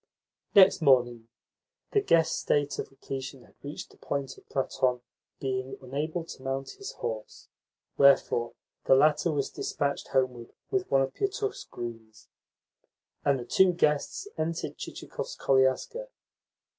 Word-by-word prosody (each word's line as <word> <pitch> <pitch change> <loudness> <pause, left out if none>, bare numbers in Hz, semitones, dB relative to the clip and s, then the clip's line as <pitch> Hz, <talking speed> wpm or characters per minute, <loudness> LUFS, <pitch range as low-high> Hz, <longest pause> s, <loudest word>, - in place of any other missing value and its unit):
Next 195 -3 +7
morning 120 -5 +3 0.6
the 415 - +3
guest's 165 - +3
state 145 -1 0
of - - -4
repletion 135 -1 -7
had - - -21
reached 145 +1 -7
the - - -20
point 135 -2 -3
of - - -20
Platon 130 -2 0 0.4
being 130 0 -3
unable 150 +6 -3
to 160 - -10
mount 135 0 -3
his 400 - -8
horse; 110 -2 -6 0.5
wherefore 135 -4 +4 0.3
the 135 - +6
latter 150 +4 +4
was 145 -2 -1
dispatched 140 0 -2
homeward 125 -3 -1 0.2
with 385 -1 0
one 135 0 +4
of 135 - -4
Pietukh's 410 +1 -2
grooms, 115 -2 -9 0.9
and 140 -1 +3
the 120 - -6
two 185 +8 +4
guests 155 - 0
entered 165 +1 -2
Chichikov's - - -6
koliaska. 135 - +2
135 Hz, 130 wpm, -28 LUFS, 130-155 Hz, 0.9 s, Next